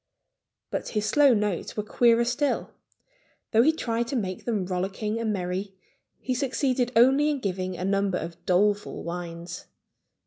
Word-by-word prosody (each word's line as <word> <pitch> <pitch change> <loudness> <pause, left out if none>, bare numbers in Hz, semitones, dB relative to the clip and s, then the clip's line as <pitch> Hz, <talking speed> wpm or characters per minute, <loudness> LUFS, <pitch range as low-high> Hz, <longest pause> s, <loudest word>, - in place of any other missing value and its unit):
But - - -3
his 210 -1 -1
slow 285 +3 +5
notes 205 -3 -2
were 210 - 0
queerer 235 +2 +3
still. 275 +4 -1 0.8
Though 225 - +5
he 300 +6 +5
tried 235 -6 -2
to 270 - -3
make 185 -6 -3
them 215 -6 -1
rollicking 195 +4 -2
and 225 -2 -1
merry, 190 0 -3 0.4
he 255 - -2
succeeded 255 -1 0
only 265 +6 +5
in 295 - 0
giving 185 -4 -3
a 180 - -3
number 195 -1 +1
of 170 -1 -7
doleful 205 +3 +1
whines. 170 0 -6
210 Hz, 150 wpm, -26 LUFS, 185-245 Hz, 0.8 s, slow